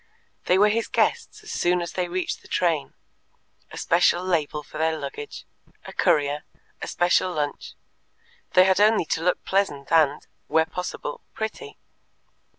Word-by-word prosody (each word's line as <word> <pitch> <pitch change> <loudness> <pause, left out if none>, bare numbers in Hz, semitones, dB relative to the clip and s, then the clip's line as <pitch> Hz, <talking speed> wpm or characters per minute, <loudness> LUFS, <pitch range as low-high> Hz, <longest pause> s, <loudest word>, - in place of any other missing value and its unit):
They 180 - +4
were 210 +2 +5
his 225 +2 0
guests 470 - 0
as - - -8
soon 180 +1 +1
as 170 -1 -4
they 180 -1 -1
reached 180 +1 -3
the - - -16
train; 165 -5 0 0.7
a - - -10
special 175 +1 +3
label 155 -4 -1
for 155 - -9
their 160 0 +1
luggage; 145 0 -7 0.4
a - - -9
courier; 145 0 +2 0.4
a - - -4
special 180 +1 +2
lunch; 150 -3 -3 0.8
they 185 - +7
had 190 0 +3
only 215 -4 +4
to 160 - -1
look 180 +2 0
pleasant 170 -9 -1
and, 155 -3 +3 0.2
where 160 +1 +3
possible, 180 -4 -5
pretty. 220 - -5
175 Hz, 155 wpm, -24 LUFS, 150-185 Hz, 0.8 s, they